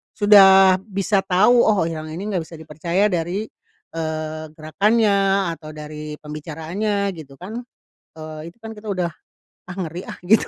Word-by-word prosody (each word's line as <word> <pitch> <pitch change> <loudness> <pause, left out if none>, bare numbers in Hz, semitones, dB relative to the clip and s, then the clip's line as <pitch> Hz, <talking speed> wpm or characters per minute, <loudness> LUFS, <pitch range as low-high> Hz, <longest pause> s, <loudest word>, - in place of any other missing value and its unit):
sudah 195 -2 +7
bisa 195 0 0
tahu 195 +6 +4
oh 210 -5 +3
yang 160 -1 -4
ini 160 +5 -6
nggak 185 - 0
bisa 165 - -11
dipercaya 170 +6 -1
dari, 175 +4 -1 0.5
eee, 155 -1 -4
gerakannya 195 +3 +2
atau 155 -2 -9
dari 150 0 -7
pembicaraannya 165 +7 -3
gitu 155 -6 -11
kan, 200 - -7 0.6
eee, 155 +1 -8
itu - - -34
kan 225 0 -8
kita 210 0 -6
udah, 180 -3 0 0.6
"Ah, 180 - -7
ngeri 180 -1 -5
ah," - - -6
gitu. 210 +5 +4
180 Hz, 150 wpm, -21 LUFS, 155-200 Hz, 0.6 s, sudah